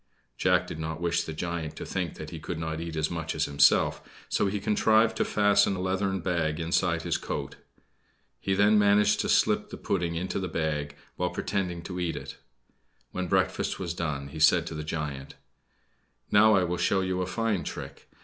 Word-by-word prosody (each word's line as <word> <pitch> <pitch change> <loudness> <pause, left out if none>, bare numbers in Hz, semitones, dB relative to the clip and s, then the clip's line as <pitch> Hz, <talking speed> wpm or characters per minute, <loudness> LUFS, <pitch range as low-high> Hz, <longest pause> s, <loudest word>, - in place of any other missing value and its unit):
Jack 90 +4 +2
did 80 - -7
not 80 0 -4
wish 85 0 0
the - - -5
giant 85 0 -4
to - - -6
think 90 -4 -3
that 80 0 -8
he 80 - -6
could 85 +2 -5
not 80 0 -3
eat 85 -1 -5
as 80 +1 -1
much 80 -1 -3
as 80 0 +1
himself, 70 0 +3 0.3
so - - +1
he 100 +1 -1
contrived 110 +2 +3
to - - +2
fasten 105 -1 +3
a - - -5
leathern 95 0 -1
bag 80 -3 -1
inside 85 0 0
his 85 -2 0
coat. - - -5 0.8
He 95 - 0
then 105 +2 +5
managed 105 0 +4
to - - -1
slip - - +2
the - - -7
pudding 85 -3 -1
into 90 +4 -2
this 95 -3 -4
bag, 75 -3 -2 0.2
while 90 0 0
pretending 90 -1 -3
to 90 +1 -5
eat 85 -2 -1
it. - - -8 0.7
When 95 0 -3
breakfast - - 0
was 85 -3 -3
done, 75 -5 -3
he 80 - -8
said 85 +2 +5
to 85 - -6
the 75 -1 -5
giant: 75 -3 -5 1.0
"Now 110 +1 +6
I 95 - +3
will 90 0 -1
show 95 +2 +2
you 95 0 -1
a 90 - -2
fine 110 -2 -1
trick. - - -8
85 Hz, 195 wpm, -28 LUFS, 80-95 Hz, 1.0 s, Now